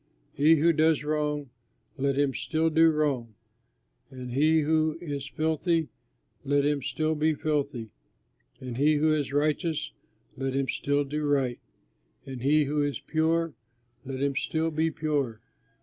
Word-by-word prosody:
He 155 Hz, +4 st, +5 dB
who 165 Hz, +2 st, +3 dB
does 155 Hz, -1 st, +2 dB
wrong, 150 Hz, -2 st, -2 dB, 0.4 s
let 140 Hz, 0 st, 0 dB
him 140 Hz, -2 st, +2 dB
still 160 Hz, +3 st, 0 dB
do 165 Hz, +1 st, +5 dB
wrong, 140 Hz, -8 st, -1 dB, 0.7 s
and 125 Hz, -1 st, -8 dB
he 155 Hz, +5 st, +3 dB
who 155 Hz, +1 st, +1 dB
is 145 Hz, -5 st, -5 dB
filthy, 160 Hz, +2 st, 0 dB, 0.5 s
let 145 Hz, 0 st, +2 dB
him 145 Hz, -1 st, +1 dB
still 155 Hz, +4 st, -1 dB
be 155 Hz, 0 st, +1 dB
filthy, 140 Hz, -7 st, -2 dB, 0.7 s
and 125 Hz, -2 st, -6 dB
he 150 Hz, +3 st, +4 dB
who 155 Hz, +1 st, +3 dB
is 145 Hz, -3 st, -1 dB
righteous, 150 Hz, +2 st, 0 dB, 0.4 s
let 135 Hz, 0 st, -3 dB
him 135 Hz, -1 st, 0 dB
still 145 Hz, +2 st, 0 dB
do 150 Hz, +2 st, -3 dB
right, 135 Hz, -4 st, +1 dB, 0.7 s
and 130 Hz, -3 st, -7 dB
he 150 Hz, +4 st, +3 dB
who 145 Hz, +1 st, 0 dB
is 145 Hz, -1 st, -1 dB
pure, 165 Hz, 0 st, 0 dB, 0.5 s
let 135 Hz, 0 st, -4 dB
him 140 Hz, -1 st, 0 dB
still 160 Hz, +3 st, -1 dB
be 160 Hz, +1 st, +1 dB
pure. 145 Hz, -8 st, -2 dB
150 Hz, 150 wpm, -27 LUFS, 140-155 Hz, 0.7 s, He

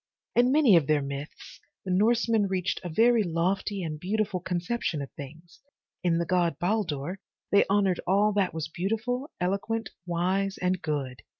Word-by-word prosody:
In 245 Hz, +1 st, +4 dB
many 280 Hz, -9 st, +6 dB
of 160 Hz, -5 st, +4 dB
their 150 Hz, -2 st, +2 dB
myths 140 Hz, +2 st, -8 dB, 0.3 s
the 185 Hz, -, -2 dB
Norsemen 220 Hz, +2 st, +3 dB
reached 190 Hz, 0 st, -1 dB
a 175 Hz, -, -4 dB
very 230 Hz, +6 st, +4 dB
lofty 185 Hz, +2 st, -1 dB
and 155 Hz, -2 st, -4 dB
beautiful 200 Hz, +1 st, -1 dB
conception 180 Hz, 0 st, -2 dB
of 140 Hz, -2 st, -6 dB
things. 160 Hz, +5 st, -11 dB, 0.4 s
In 170 Hz, -2 st, +2 dB
the 170 Hz, -, 0 dB
god 175 Hz, -1 st, +1 dB
Baldur, 180 Hz, -3 st, -1 dB, 0.3 s
they 200 Hz, -, +5 dB
honored 195 Hz, -3 st, +2 dB
all 205 Hz, +3 st, +3 dB
that 195 Hz, -3 st, +1 dB
was 160 Hz, -1 st, -4 dB
beautiful, 225 Hz, -, -2 dB
eloquent, 200 Hz, +5 st, -2 dB, 0.2 s
wise 190 Hz, +3 st, 0 dB
and 180 Hz, 0 st, 0 dB
good. 140 Hz, -5 st, -3 dB
185 Hz, 160 wpm, -27 LUFS, 165-210 Hz, 0.4 s, many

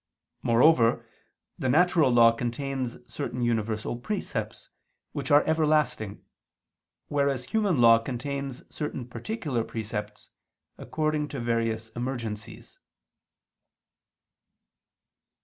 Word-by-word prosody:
Moreover 115 Hz, 0 st, +4 dB, 0.5 s
the 130 Hz, -, 0 dB
natural 160 Hz, 0 st, +4 dB
law 115 Hz, -1 st, +7 dB
contains 125 Hz, +2 st, -3 dB
certain 120 Hz, +1 st, -4 dB
universal 110 Hz, -1 st, -1 dB
precepts, 205 Hz, -, -4 dB, 0.4 s
which 140 Hz, -3 st, -4 dB
are 145 Hz, +1 st, +6 dB
everlasting: 155 Hz, -9 st, +1 dB, 0.8 s
whereas 140 Hz, -3 st, 0 dB
human 200 Hz, -, +1 dB
law 115 Hz, -1 st, +7 dB
contains 135 Hz, +2 st, -5 dB
certain 150 Hz, -5 st, -4 dB
particular 145 Hz, -, -3 dB
precepts, 105 Hz, -2 st, -6 dB, 0.5 s
according 155 Hz, -1 st, -1 dB
to 140 Hz, -1 st, -6 dB
various 115 Hz, -1 st, -1 dB
emergencies. 120 Hz, -3 st, -6 dB
125 Hz, 85 wpm, -27 LUFS, 115-145 Hz, 0.8 s, law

